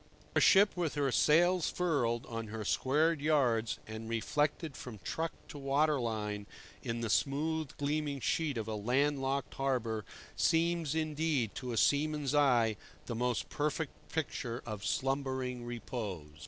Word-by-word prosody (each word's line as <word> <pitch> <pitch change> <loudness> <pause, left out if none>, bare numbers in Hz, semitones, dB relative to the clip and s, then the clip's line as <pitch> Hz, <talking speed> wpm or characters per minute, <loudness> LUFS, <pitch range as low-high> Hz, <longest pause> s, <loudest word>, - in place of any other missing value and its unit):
For - - +4
a - - +1
ship 200 +1 +6
with 170 -4 -1
her 140 -2 +1
sails 175 +5 +4
furled 130 -10 0
on 115 -1 -5
her 110 0 -5
squared 150 +7 +2
yards, 120 -8 +2
and 110 +1 -7
reflected 145 +6 0
from 125 -4 -8
truck 165 0 -2 0.2
to 145 - -8
water 140 +2 +2
line 105 -3 -3 0.3
in 115 0 -3
the 115 - -1
smooth 155 +3 0
gleaming 145 0 -1
sheet 150 0 0
of 110 -1 -3
a 110 - -2
landlocked 135 +5 0
harbour, 120 -5 -1 0.3
seems, 165 -2 +2
indeed, 155 -7 0
to 125 -1 -5
a 115 - -2
seaman's 145 0 +2
eye 120 -7 +4 0.3
the 120 - -4
most 125 +1 -1
perfect 150 +1 -1 0.2
picture 125 -6 -3
of 105 -3 -5
slumbering 130 -2 -1
repose. 105 -10 -5
135 Hz, 145 wpm, -33 LUFS, 115-150 Hz, 0.3 s, ship